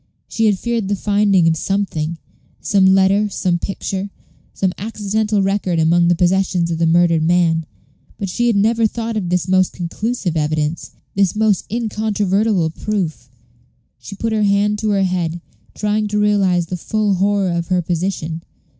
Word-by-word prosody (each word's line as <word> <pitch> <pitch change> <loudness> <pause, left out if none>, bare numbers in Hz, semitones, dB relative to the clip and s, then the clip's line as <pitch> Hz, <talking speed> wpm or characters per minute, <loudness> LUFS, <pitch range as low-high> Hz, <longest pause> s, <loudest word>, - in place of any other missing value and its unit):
She 225 -1 0
had 205 -2 +2
feared 235 -1 -2
the 205 - 0
finding 200 -3 +2
of 165 - +3
something 170 -3 -2 0.4
some 195 -2 +3
letter 195 +2 +3
some 180 -3 -1
picture 195 +1 -4 0.4
some 190 -2 -1
accidental 210 0 -1
record 195 -3 0
among 170 +2 +3
the 175 - +3
possessions 180 -1 +1
of 165 - -2
the 165 - +2
murdered 170 -1 +3
man, 165 -1 +2 0.5
but 200 - -3
she 240 +6 -1
had 235 - +2
never 225 +2 +3
thought 230 +1 -4
of 190 -5 -2
this 180 -1 0
most 185 0 +2
conclusive 180 +1 -3
evidence, 155 +1 -1 0.2
this 195 -1 +1
most 215 -3 +1
incontrovertible 210 -5 0
proof. 170 -9 -3 0.7
She 200 - -9
put 225 +2 -2
her 215 - +1
hand 205 +1 +2
to 215 - -1
her 200 -1 +2
head, 175 -2 -1 0.4
trying 210 0 0
to 210 0 -2
realize 195 -4 +2
the 180 +2 -5
full 210 +3 0
horror 195 0 +1
of 170 -1 -2
her 180 -1 0
position. 170 -2 -3
195 Hz, 165 wpm, -18 LUFS, 175-210 Hz, 0.7 s, of